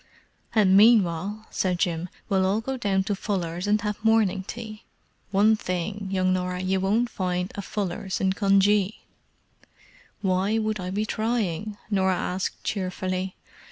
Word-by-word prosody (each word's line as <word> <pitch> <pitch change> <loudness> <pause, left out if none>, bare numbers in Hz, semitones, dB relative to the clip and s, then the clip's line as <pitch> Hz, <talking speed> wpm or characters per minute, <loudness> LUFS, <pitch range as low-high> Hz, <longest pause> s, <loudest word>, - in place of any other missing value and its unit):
"And 195 -3 +5
meanwhile," 205 -1 +4
said 180 -2 0
Jim, 175 0 -1 0.2
"we'll 190 -2 +2
all 195 +3 +2
go 265 +4 -3
down 200 -6 +1
to 200 +1 -1
Fuller's 180 -3 -3
and 210 +1 +3
have 210 0 -3
morning 220 -4 +3
tea. 215 +2 -8 0.5
One 210 +3 +4
thing, 195 +1 -3
young 185 -1 +1
Norah, 180 0 -2
you 190 +1 +1
won't 210 +6 +2
find 180 -1 -2
a 200 - -4
Fuller's 190 -1 -3
in 190 -1 +2
Cunjee!" 200 0 +3 1.2
"Why 190 +3 +1
would 215 -1 -1
I 180 0 -4
be 205 +3 -1
trying?" 215 -3 -2
Norah 190 -2 +2
asked 185 +1 -3
cheerfully. 185 -1 -2
195 Hz, 145 wpm, -25 LUFS, 185-210 Hz, 1.2 s, And